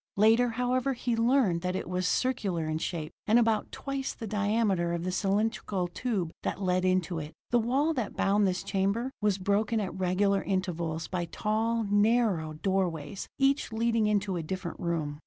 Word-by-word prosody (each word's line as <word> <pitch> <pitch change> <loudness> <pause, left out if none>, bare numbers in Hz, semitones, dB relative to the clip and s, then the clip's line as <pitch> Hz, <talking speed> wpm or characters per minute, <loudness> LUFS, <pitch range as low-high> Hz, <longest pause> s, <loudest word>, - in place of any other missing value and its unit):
Later, 225 +4 +5
however, 250 +3 0
he 240 -1 -1
learned 230 -7 +2
that 180 +1 -2
it - - -3
was 180 0 -1
circular 195 -11 0
in 155 0 -2
shape, 160 -3 -4
and 220 +2 +5
about 225 -2 +2
twice 275 -1 -4
the 225 - -6
diameter 205 -4 +1
of 170 0 -2
the 185 - -1
cylindrical 195 -1 0
tube 185 -3 -2
that - - -3
led 185 -1 +1
into 185 -2 +1
it. 150 0 -7 0.2
The 240 - +4
wall 270 +8 +1
that 245 -8 -3
bound 200 +1 +3
this 185 0 -1
chamber 200 +6 0
was 205 -2 +2
broken 205 +4 +1
at 200 -3 -3
regular 190 +2 +1
intervals 170 -4 -2
by 175 -2 -2
tall, 220 +6 0
narrow, 205 -6 +2
doorways, 175 -1 -2
each 275 -1 +2
leading 225 -1 +1
into 205 -3 0
a - - -2
different 175 +2 -5
room. 155 -4 -2
200 Hz, 175 wpm, -29 LUFS, 180-230 Hz, 0.2 s, Later